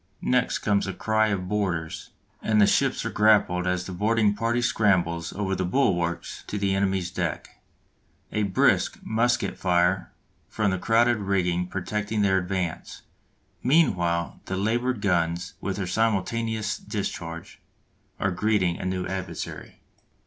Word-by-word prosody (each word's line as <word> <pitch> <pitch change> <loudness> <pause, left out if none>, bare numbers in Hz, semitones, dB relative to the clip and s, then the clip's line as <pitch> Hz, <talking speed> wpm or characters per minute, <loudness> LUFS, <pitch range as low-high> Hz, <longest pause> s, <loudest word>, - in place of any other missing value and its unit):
Next 125 0 +2
comes 100 -1 +1
a 95 - -3
cry 110 +3 +1
of 95 -3 -2
"Boarders!" 90 -6 -2 0.3
and 110 -1 +2
the 105 - +7
ships - - +1
are - - -2
grappled 100 -4 +3
as 90 -1 0
the 95 - -6
boarding 105 +3 +2
party 115 +3 0
scrambles 90 -8 +1
over 95 -1 -2
the 95 0 -1
bulwarks 90 -5 0
to 105 - -3
the 100 -1 +1
enemy's 95 -2 0
deck, - - -4 0.7
a 105 - 0
brisk 100 -2 +2
musket 120 +2 0
fire 90 0 +1 0.4
from 105 -3 0
the 95 - -1
crowded 120 +3 +3
rigging 90 -3 0
protecting 105 +3 -2
their 95 -1 +3
advance; 90 -2 -4 0.6
meanwhile 90 - +2
the 95 - -3
larboard 120 +3 0
guns, 85 -2 0
with 95 - -2
their 100 - -2
simultaneous 110 +2 0
discharge, 85 -5 -5 0.6
are 95 - +1
greeting 95 -2 +1
a - - -5
new 95 0 -2
adversary. 95 0 -6
95 Hz, 140 wpm, -25 LUFS, 90-110 Hz, 0.7 s, the